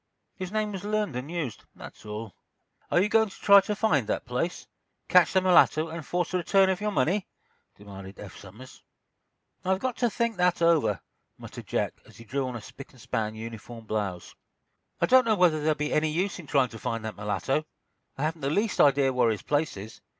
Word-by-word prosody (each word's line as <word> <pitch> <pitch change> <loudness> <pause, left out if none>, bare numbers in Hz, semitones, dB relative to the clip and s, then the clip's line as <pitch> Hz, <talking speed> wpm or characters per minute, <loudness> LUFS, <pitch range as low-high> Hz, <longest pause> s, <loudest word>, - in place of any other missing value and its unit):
"His 185 -2 -6
name 215 -1 -1
was 190 -2 -6
learned 210 -7 -1
and 125 +4 -5
used—that's 155 -9 -7
all." 105 -1 -6 0.6
"Are - - +3
you 190 - +3
going 220 0 +3
to - - -13
try 200 -1 +7
to 210 +2 -3
find 155 - +1
that - - -2
place, 125 +9 -3 0.4
catch 180 -1 +5
the 190 - +4
mulatto 165 -3 +4
and 165 0 -6
force 175 +3 -2
the 185 - 0
return 190 +2 +3
of 190 - -3
your 210 - 0
money?" 185 +2 0 0.5
demanded 100 -1 -11
Eph 100 -3 -10
Somers. 110 +7 -13 0.8
"I've 190 +1 +1
got 250 +4 -3
to 240 - +2
think 235 -2 -1
that 180 0 +2
over," 170 -3 +2 0.4
muttered - - -10
Jack, - - -2
as - - -18
he 115 - -12
drew 135 +3 -2
on 125 - -5
a 120 - -6
spick 135 - -12
and 130 - -18
span 110 -3 -3
uniform 115 +1 -9
blouse. 100 -5 -4 0.7
"I - - +3
don't 255 0 +6
know 220 -2 +3
whether 175 -5 +3
there'll 155 +1 +1
be 150 0 -2
any 155 +1 +2
use 180 +5 -2
in 165 - -10
trying 135 -2 +2
to 115 - -10
find 115 -2 -3
that 110 - -5
mulatto. 120 +8 -1 0.5
I 135 - -3
haven't 160 +1 -2
the 135 - -1
least 205 +8 +1
idea 140 -2 +4
where 125 -2 +3
his 110 -2 -2
place 145 -4 -1
is. 105 +3 -10
155 Hz, 210 wpm, -27 LUFS, 115-190 Hz, 0.8 s, try